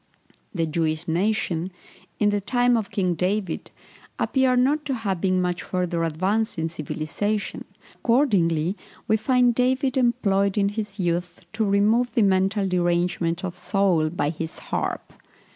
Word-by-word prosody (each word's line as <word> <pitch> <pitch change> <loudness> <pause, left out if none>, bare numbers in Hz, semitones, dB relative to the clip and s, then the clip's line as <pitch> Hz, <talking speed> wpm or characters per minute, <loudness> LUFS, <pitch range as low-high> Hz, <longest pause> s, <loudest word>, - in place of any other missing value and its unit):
The 165 -4 -1
Jewish 160 +1 -1
nation, 180 0 0 0.5
in 205 -1 +2
the 205 0 0
time 245 +3 +2
of 220 -3 -1
King 185 -3 0
David, 185 +1 -2 0.5
appear 260 -1 +2
not 280 +5 +2
to 270 - -1
have 195 -7 -2
been 185 -1 +2
much 180 -1 -1
further 180 -2 -2
advanced 190 +8 0
in 160 0 -1
civilization; 170 +6 -3 0.3
accordingly 190 - +2 0.3
we 220 - +4
find 245 +2 +3
David 260 +2 +1
employed 205 -6 +2
in 200 -1 +3
his 205 -1 -5
youth 175 0 -2
to 220 0 0
remove 215 +5 +2
the 230 - +4
mental 195 +1 +2
derangement 175 -1 0
of 180 - -4
Saul 180 -5 +1
by 155 -3 -1
his 160 0 -6
harp. - - -4
195 Hz, 145 wpm, -24 LUFS, 175-220 Hz, 0.5 s, we